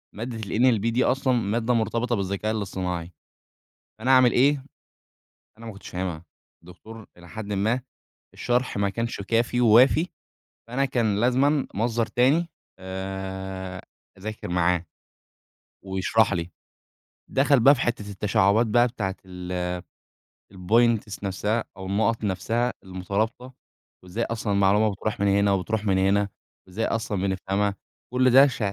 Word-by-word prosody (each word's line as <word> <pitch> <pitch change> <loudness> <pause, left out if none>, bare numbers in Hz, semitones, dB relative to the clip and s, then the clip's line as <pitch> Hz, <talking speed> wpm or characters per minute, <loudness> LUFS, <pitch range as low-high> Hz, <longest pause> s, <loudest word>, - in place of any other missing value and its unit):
مادة 115 +2 -5
الNLB 115 +1 +2
دي 125 +3 +2
أصلًا 130 0 +1
مادة 115 +1 0
مرتبطة 115 +1 0
بالذكاء 100 +2 -2
الاصطناعي، 90 -4 -4 0.9
فأنا 125 +4 -1
اعمل 130 -2 +6
إيه؟ 135 +1 +3 0.9
أنا 115 - -11
ما 110 - -6
كنتش 100 - -12
فاهمها، 90 -3 -4 0.4
الدكتور 110 +5 -12
إلى 85 0 -15
حدٍ 105 +4 -6
ما 110 +6 +1 0.5
الشرح 125 -1 -1
ما 100 0 +1
كانش 115 +1 -3
كافي 115 +4 0
ووافي 125 +9 +5 0.6
فأنا 130 +4 0
كان 115 -6 0
لازمًا 135 +4 +2
مصدر 115 +2 0
تاني 140 +9 +2 0.3
آآ 95 0 -6 0.4
أذاكر 110 +1 -6
معاه 90 0 +1 1.0
ويشرح 95 +3 +1
لي، 85 0 -3 0.8
دخل 140 0 +3
بقى 135 +5 +7
في - - -6
حتة 115 -4 -2
التشعبات 105 +2 +2
بقى 120 +3 +4
بتاعة 105 -6 -3
ال 90 -1 -4 0.8
الpoints 110 +2 +1
نفسها 105 +4 -1
أو 95 -1 -8
النقط 110 +3 0
نفسها 115 +5 0
المترابطة 100 +7 -3 0.5
وإزاي 100 +6 -3
أصلًا 110 -2 -3
المعلومة 100 +2 +3
بتروح 100 +1 -4
من 100 - +2
هنا 100 0 +3
وبتروح 105 +3 -1
من 95 -2 +2
هنا، 100 +1 +2 0.4
وإزاي 100 +5 -3
أصلًا 110 -3 -2
بنفهمها، 100 +1 -1 0.4
كل 130 0 +3
ده 135 +3 +8
ش 130 - -4
110 Hz, 130 wpm, -25 LUFS, 95-120 Hz, 1.0 s, ده